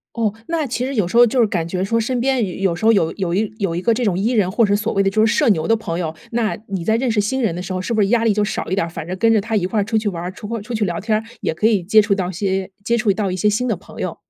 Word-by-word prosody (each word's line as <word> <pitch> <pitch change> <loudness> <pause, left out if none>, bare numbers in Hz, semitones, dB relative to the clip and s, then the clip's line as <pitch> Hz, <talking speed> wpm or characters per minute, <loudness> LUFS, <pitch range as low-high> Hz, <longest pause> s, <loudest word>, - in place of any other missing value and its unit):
哦， 220 -3 0
那 330 -2 -1
其 250 0 -2
实 275 - -4
有 200 -6 +1
时 230 - -3
候， 240 0 +8
就 245 +2 +1
是 225 - +5
感 170 -4 -1
觉 180 +2 -2
说 230 +4 +1
身 240 +2 -1
边 240 -8 0
有 180 -3 +2
时 215 - -6
候 225 - +6
有 165 -6 +2
有 180 -3 -2
一 215 +2 0
有 195 -5 -1
一 175 - -3
个 230 - +3
这 240 +2 -1
种 185 -4 +1
E 210 +6 0
人， 210 -7 +2
或 215 +4 +2
者 205 0 +2
所 215 +2 -2
谓 195 - +2
的 195 - +1
就 215 +2 +3
是 225 - +1
社 290 -6 +3
牛 160 -7 +2
的 225 - +4
朋 175 -6 -3
友， 160 -2 -3 0.2
那 230 -2 0
你 190 -4 -3
在 220 - +2
认 250 0 0
识 215 -1 +2
新 260 +6 -1
人 205 -7 +1
的 175 - -5
时 185 - -5
候 185 - -2
是 230 - -3
不 220 - +1
是 200 - +4
压 230 0 +2
力 225 -2 +3
就 210 0 +1
少 205 - -3
一 190 - 0
点？ 170 - 0
反 165 -1 -7
正 185 - -3
跟 225 +1 +4
着 215 - +4
他 220 +1 -2
一 180 -3 +1
块 210 +1 0
出 220 +2 0
去 215 -1 -1
玩 170 -3 -4
儿， 180 - -4
出 205 - -9
阔 230 -1 -4
出 240 +3 -8
去 215 -2 0
聊 170 -3 -2
天 215 -1 +1
儿， 220 - -7 0.2
也 - - -1
可 210 +7 0
以 210 -5 +3
接 215 +5 +5
触 205 -1 +2
到 185 -2 -2
些 190 +1 -2
接 235 +1 +2
触 215 -4 +2
到 195 -2 -2
一 - - -2
些 210 +3 +2
新 250 +5 0
的 225 - +1
朋 185 - -14
友？ - - -3
210 Hz, 385 characters per minute, -20 LUFS, 185-230 Hz, 0.2 s, 候